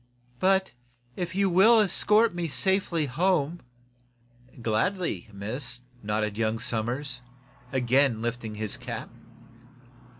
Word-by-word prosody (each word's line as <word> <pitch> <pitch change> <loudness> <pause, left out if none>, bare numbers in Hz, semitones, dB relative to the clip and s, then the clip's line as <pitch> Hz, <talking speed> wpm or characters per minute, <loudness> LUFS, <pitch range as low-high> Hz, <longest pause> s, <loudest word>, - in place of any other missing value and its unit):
"But, 190 0 +2 0.4
if 175 0 -4
you 200 0 +2
will 195 +6 +6
escort 210 +2 +4
me 175 -1 -2
safe 190 +5 +1
home 165 +1 0 0.5
" 120 0 -22
"Gladly, 160 - -1
miss," 120 +5 -3 0.2
nodded 105 0 -2
young 110 0 +1
Somers, 125 +4 -2 0.5
again 130 -1 +2
lifting 115 -1 -4
his 105 -1 -4
cap. - - -7
130 Hz, 105 wpm, -27 LUFS, 115-180 Hz, 0.5 s, will